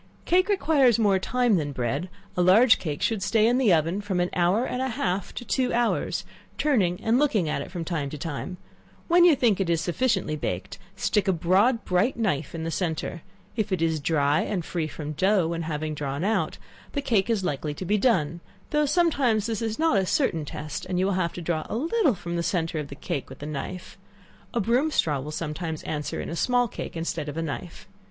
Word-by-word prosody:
Cake 370 +3 +3
requires 285 - +4
more 205 -4 +3
time 245 0 +2
than 145 -3 -2
bread: 135 +8 -2 0.3
a 180 - +1
large 215 +7 +6
cake 150 -5 -4
should 220 -4 0
stay 215 +2 +3
in 245 +3 +3
the 240 -7 +4
oven 165 +4 +2
from 200 -3 -2
an 175 0 0
hour 185 +7 +2
and 250 - -3
a 265 - 0
half 190 -5 -2
to 245 - -6
two 255 +3 0
hours, 240 -1 0 0.3
turning 200 -12 +2
and 230 +3 +3
looking 225 - +2
at 145 - -1
it - - -7
from 175 -2 -5
time 155 -5 -2
to 150 - -6
time; 165 +4 -5 0.5
when 345 0 +6
you 340 -4 +7
think 230 -7 +2
it 185 - -1
is 165 -1 +2
sufficiently 190 -1 0
baked, 150 - -4 0.2
stick 210 -2 0
a - - +5
broad 190 +8 +2
bright 185 +8 +1
knife 170 -10 -1
in 160 - -4
the 165 - -2
centre; 165 -1 -2 0.3
if 215 -4 -1
it 185 - +1
is 160 -1 +1
dry 145 -1 +2
and 185 -6 -2
free 165 -3 -2
from 150 0 -6
dough 185 +2 +2
when 155 -2 -3
drawn 145 +1 -3
out, 220 +3 0 0.4
the 285 - -1
cake 220 -6 +1
is 220 -4 +1
likely 150 -3 -2
to 185 - -6
be 210 +3 +1
done, 170 - +2 0.3
though 300 -1 +2
sometimes 280 - +2
this 225 -2 -2
is 225 -1 -2
not 315 -10 +3
a 190 - 0
certain 165 - +1
test, 150 0 -6
and 180 -1 -2
you 185 - +2
will 200 - +1
have 180 -2 0
to 175 - -7
draw 160 -2 -1
a - - -3
little 320 - +2
from 175 -1 -5
the 170 - 0
centre 165 -2 -1
of 150 - -4
the 140 - -9
cake 140 - -4
with - - -10
the 145 - -8
knife. 155 +6 -6 0.5
A 235 - -1
broom 245 +8 +2
straw 150 - +1
will 140 +3 -6
sometimes 160 +1 -4
answer 150 -1 -3
in - - -4
a 165 - -4
small 245 +6 +2
cake 185 - -7
instead 165 -2 -3
of 145 - -6
a 165 - -1
knife. 165 +2 -6
185 Hz, 220 wpm, -26 LUFS, 160-230 Hz, 0.5 s, you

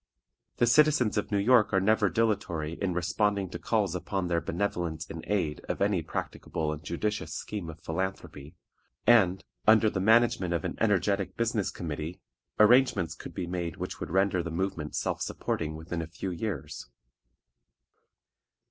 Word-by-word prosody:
The - - +4
citizens 140 -2 +4
of 105 - -1
New 100 - +2
York 110 +2 +4
are 95 - +5
never 105 +1 +3
dilatory 85 -6 0
in 90 0 -2
responding 95 +2 0
to 85 - -5
calls 100 0 0
upon 90 0 -2
their 85 -1 +1
benevolence 85 -3 -2
in 80 - -7
aid 85 -8 -1
of - - -2
any 100 -3 +2
practicable 80 -1 -3
and 75 +1 -9
judicious 105 +5 -3
scheme 100 -6 -5
of 80 0 -11
philanthropy, 85 -3 -4 0.5
and, 95 -5 +4 0.2
under 110 -1 +6
the 95 - -2
management 110 -3 +3
of 85 - -2
an - - -3
energetic 100 -2 +1
business 115 -3 0
committee, 80 +1 -5 0.4
arrangements 105 -7 +5
could 85 -1 -10
be 90 - -2
made 85 -2 -3
which - - -5
would - - -5
render 95 +1 +2
the 85 - -5
movement 85 -3 -3
self - - -2
supporting 80 -1 -2
within 85 +2 -4
a 80 - -5
few 90 +3 -5
years. 90 -4 -5
95 Hz, 155 wpm, -29 LUFS, 85-105 Hz, 0.5 s, under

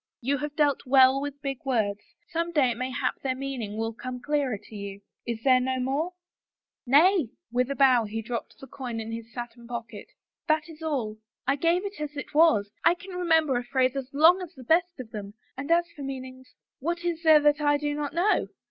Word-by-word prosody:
" - - -67
You 280 -1 +2
have 295 0 -4
dealt 290 -4 +1
well 265 +1 +6
with 285 0 -6
big 270 -2 -3
words 220 -7 0 0.2
— 340 - -42
some 335 +1 -1
day 280 -7 +3
it 230 - -5
may 255 +1 -2
hap 255 - -2
their 260 -1 -1
meaning 255 -6 -4
will 225 +1 -2
come 250 +2 -6
clearer 280 -3 0
to 215 - -14
you. 200 -1 -7 0.3
Is 230 -1 -3
there 255 -2 +5
no 260 +1 -1
more? 280 +8 -1 0.2
'* - - -67
" - - -67
Nay." 350 - +4 0.2
With 250 +2 +1
a 280 - -2
bow 255 -4 +5
he 220 +2 -4
dropped 235 +1 -5
the - - -11
coin 245 -3 -6
in 225 0 -5
his 230 0 -7
satin 240 -1 -8
pocket. 230 -3 -7 0.4
"That 310 0 +2
is 320 -1 -13
all. 250 -9 -2 0.3
I 275 +2 +2
gave 335 +6 +1
it 400 -5 -6
as 300 -1 -5
it 285 - -6
was 295 -11 +4
— - - -40
I 335 - +5
can 365 +2 -11
re 360 -1 -3
' - - -4
member 315 -5 +4
a 245 - -2
phrase 255 +1 +1
as 270 -1 -4
long 325 +6 +5
as 360 -1 -8
the 260 - -11
best 340 +4 +2
of 235 -3 -8
them, 205 -1 -7 0.2
and 280 +3 -6
as 340 +1 +4
for 290 - -9
meanings 260 -1 -7
— - - -66
what 345 +4 -3
is 335 -2 -1
there 315 -2 +7
that 295 0 +3
I 290 0 +3
do 295 0 -2
not 290 -1 -3
know? 355 +7 +2
270 Hz, 245 wpm, -27 LUFS, 245-310 Hz, 0.4 s, there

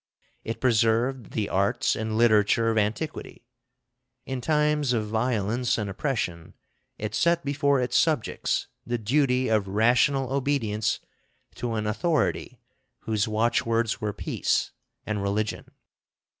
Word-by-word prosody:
It 115 - -5
preserved 120 +1 +1
the 105 -3 -1
arts 100 0 +1
and 110 0 -2
literature 115 0 +4
of 110 - -1
antiquity. 115 +4 -3 0.8
In 130 -1 -4
times 150 -1 +1
of 110 -3 0
violence 115 +1 0
and 105 -3 -3
oppression, 95 - -3 0.4
it 105 0 -4
set 170 +6 +2
before 140 -1 +2
its 125 -1 +2
subjects 155 -8 0 0.2
the 120 0 -2
duty 125 +3 +1
of 110 -3 +1
rational 125 +6 +2
obedience 120 -6 0 0.5
to 120 -2 -3
an 110 -1 -2
authority 150 +9 -1 0.4
whose 110 +1 0
watchwords 115 +1 0
were 105 -1 -1
peace - - -1 0.3
and 105 -2 -2
religion. 105 +2 -2
115 Hz, 120 wpm, -26 LUFS, 105-130 Hz, 0.8 s, literature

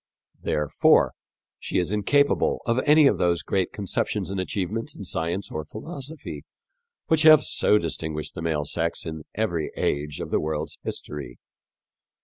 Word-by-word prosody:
Therefore 75 -1 +3 0.5
she - - -3
is 90 +1 0
incapable 140 +7 +2
of 115 +1 +1
any 150 0 +7
of - - +3
those 85 -1 +1
great 95 -2 0
conceptions 100 -1 -2
and 100 - -2
achievements 105 - -3
in - - -8
science 85 +2 -3
or 80 - -3
philosophy 145 - -7 0.6
which 160 -1 +3
have 155 -1 +8
so 105 - +4
distinguished 80 -3 -3
the 85 - -6
male 80 -3 -1
sex 85 +3 -1
in 80 -2 -6
every 85 -8 -1
age 75 0 -1
of - - -5
the - - +2
world's 75 -1 -3
history. 70 -5 -6
90 Hz, 145 wpm, -25 LUFS, 80-115 Hz, 0.6 s, have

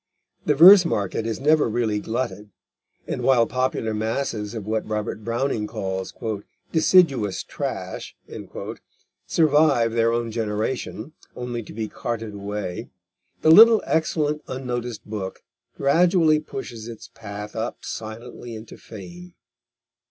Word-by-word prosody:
The 150 - +4
verse 180 +5 +10
market 110 - -1
is 115 - -3
never 150 -1 +3
really 110 -2 0
glutted, 110 -2 -4 0.6
and - - -4
while 125 -3 +4
popular 125 -2 -1
masses 110 -1 -2
of 110 -3 -5
what 110 +1 -2
Robert 105 0 -3
Browning 115 -1 -1
calls 95 -4 -4 0.6
"deciduous 155 - +3
trash" - - -5 1.1
survive 145 -7 +3
their 115 0 +2
own 115 -1 -1
generation, 110 +4 -3 0.2
only 125 -1 -4
to 105 - -11
be 110 0 -4
carted 115 -1 -5
away, 100 +1 -5 0.5
the 155 - +6
little 225 +4 +9
excellent, 150 -2 0
unnoticed 125 -3 -4
book 105 -3 -6 0.3
gradually 165 +2 +4
pushes 120 -6 -7
its 115 0 -10
path 105 -2 -8
up 115 +2 -4
silently 115 +2 -7
into 110 +1 -10
fame. 175 - -11
115 Hz, 120 wpm, -23 LUFS, 110-140 Hz, 1.1 s, verse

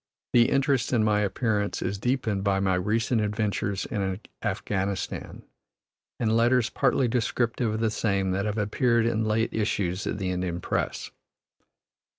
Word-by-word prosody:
The 120 -1 +5
interest 135 -3 +1
in 115 -3 +3
my 105 -1 +3
appearance 105 0 0
is 100 - -3
deepened 115 -4 0
by 100 -1 +2
my 95 -1 +1
recent 110 +5 +1
adventures 105 -1 -1
in 95 -5 -2 0.2
Afghanistan 100 -2 -3 0.8
and 110 -2 +1
letters 120 0 +3
partly 130 - +2
descriptive 115 -1 0
of 110 - -3
the 110 -1 +1
same 100 -3 0
that 95 +2 -1
have 105 +1 -2
appeared 115 +2 +2
in 115 -1 +1
late 110 +2 0
issues 105 -3 -1
of - - -2
the 95 -2 -2
Indian 90 -1 -2
press. - - -2
105 Hz, 150 wpm, -26 LUFS, 100-115 Hz, 0.8 s, The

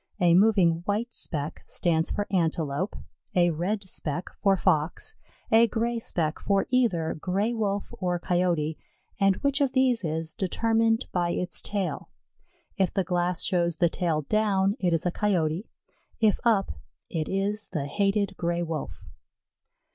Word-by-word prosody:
A 175 -2 +4
moving 185 -4 +4
white 220 +4 -1
speck 150 -2 0
stands 165 -2 +1
for 205 - -1
Antelope, 165 -1 0 0.4
a 175 -1 +4
red 190 +5 -2
speck 170 -1 -4
for 195 -2 +3
Fox, 165 - +1 0.4
a 225 +1 +6
gray 235 +1 -1
speck 165 -7 -2
for 195 -1 +1
either 205 -11 +2
Gray 200 +7 0
wolf 205 -3 -2
or 180 -2 0
Coyote, 175 -3 0 0.4
and 195 -1 +4
which 280 +1 +1
of 275 -2 +2
these 255 -4 +3
is 160 0 -1
determined 225 +4 +1
by 175 -1 0
its 180 +1 -2
tail. 200 -3 -3 0.7
If 190 -3 +2
the 195 - 0
glass 175 -1 0
shows 170 -3 +1
the 170 +1 +2
tail 160 -3 -1
down, 200 +1 +1
it 180 -2 +1
is 165 +1 0
a 180 - +1
Coyote; 180 -2 0 0.5
if 215 -2 +3
up, 215 -5 +2 0.4
it 160 -2 -3
is 200 +2 -1
the 155 -6 -3
hated 200 +5 0
Gray 170 0 -1
wolf. 155 - -5
185 Hz, 145 wpm, -27 LUFS, 170-210 Hz, 0.7 s, a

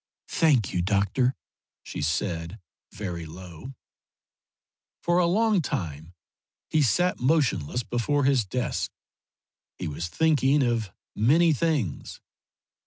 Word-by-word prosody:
"Thank 140 - +2
you, 90 - +1
doctor," 105 +7 +1 0.5
she - - -6
said, 85 +4 -2 0.3
very 85 -5 -5
low. 90 +9 -10 1.3
For 175 +1 +3
a 175 - +3
long 210 +1 +3
time 80 - -4 0.6
he 155 - +3
sat 175 +8 +2
motionless 125 - +1
before 140 +5 0
his 135 -3 +3
desk. 125 +6 -2 0.9
He - - -4
was 80 +3 -4
thinking 145 - +3
of 115 -5 0 0.2
many 155 +9 +4
things. 145 - -1
120 Hz, 105 wpm, -26 LUFS, 90-150 Hz, 1.3 s, many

